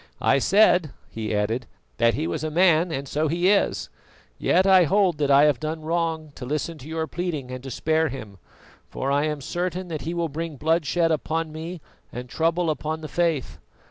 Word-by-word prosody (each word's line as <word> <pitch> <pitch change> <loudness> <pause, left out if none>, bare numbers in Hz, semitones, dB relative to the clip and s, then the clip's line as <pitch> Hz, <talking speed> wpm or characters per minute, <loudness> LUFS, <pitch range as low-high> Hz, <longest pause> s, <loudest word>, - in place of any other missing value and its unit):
"I - - +4
said," 180 -1 +4 0.2
he 110 -1 -4
added, 110 +4 -1 0.3
"that 115 -1 +3
he 155 +5 -2
was - - -3
a 155 - -1
man, 170 +1 +3
and 140 -2 -4
so 155 +4 0
he 175 +4 +2
is; 205 - +1 0.5
yet 185 - +3
I 190 -2 +6
hold 185 -3 +2
that 145 -1 +1
I 140 +1 +6
have 150 -5 +3
done 155 +2 -4
wrong 160 -1 -2
to - - -8
listen 150 +4 -3
to 135 - -11
your 160 0 -2
pleading 160 -7 -4
and 130 0 -6
to 135 - -6
spare 160 +5 +1
him, 110 -7 -8 0.5
for 135 - -3
I 145 +2 +2
am 150 -2 -3
certain 180 +4 -3
that 155 -3 -4
he 170 +3 -4
will 170 -1 0
bring 160 +1 -5
bloodshed 165 +3 +1
upon 160 +1 -1
me 165 +2 -7 0.3
and 125 +1 -7
trouble 165 +3 0
on 160 +1 -3
the 155 - -6
Faith. 160 -4 -1
155 Hz, 200 wpm, -24 LUFS, 140-170 Hz, 0.5 s, I